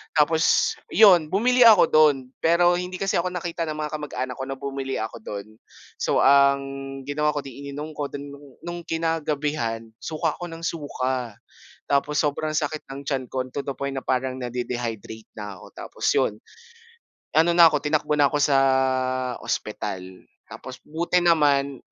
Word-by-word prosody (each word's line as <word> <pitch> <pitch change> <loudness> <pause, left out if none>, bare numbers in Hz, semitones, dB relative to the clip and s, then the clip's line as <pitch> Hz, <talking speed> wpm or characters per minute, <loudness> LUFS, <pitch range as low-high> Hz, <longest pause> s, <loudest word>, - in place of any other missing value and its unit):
Tapos 160 +2 +3 0.2
'yon, 185 -5 +7
bumili 245 +7 +2
ako 215 -5 +8
do'n 155 -3 +5 0.2
pero 175 +2 +4
hindi 180 +1 -5
kasi 195 - 0
ako 175 +1 0
nakita 170 -1 -3
ng 155 -1 -5
mga 150 - -4
kamag-anak 130 -4 -5
ko 135 - -4
na 135 0 -5
bumili 135 -1 -3
ako 110 +1 -5
dun. 100 -1 -7 0.5
So, - - +1
ang 140 0 +5 0.5
ginawa 150 +1 +1
ko, 145 - -2
eh, - - -21
'di 130 - -12
ininom 150 +2 -6
ko 145 -1 -3
dun. 145 0 -6 0.4
Nung 175 0 -5
kinagabihan, 150 -8 -2 0.2
suka 160 -1 -2
ako 175 0 -6
nang 165 - -9
suka. 130 -7 -3 0.6
Tapos 145 +1 +1
sobrang 155 +1 -1
sakit 150 0 -2
ng 135 +1 -7
tiyan 135 -3 -1
ko 130 -1 -1
to 140 - -3
the 140 - -3
point 140 0 -3
na 135 - -3
parang 130 0 -1
na-de-dehydrate 120 -3 -5
na 105 -3 -7
ako - - -13
tapos - - -9
'yon, - - +1 1.0
ano 170 +2 +5
na 170 -1 +8
'ko 150 - +2
tinakbo 150 0 0
na 145 - +6
'ko 145 0 -1
sa 140 -1 +4 0.8
ospital 95 -1 -5 0.2
tapos 130 -1 -10
buti 170 +3 0
naman 145 -5 +3
145 Hz, 165 wpm, -24 LUFS, 130-165 Hz, 1.0 s, ako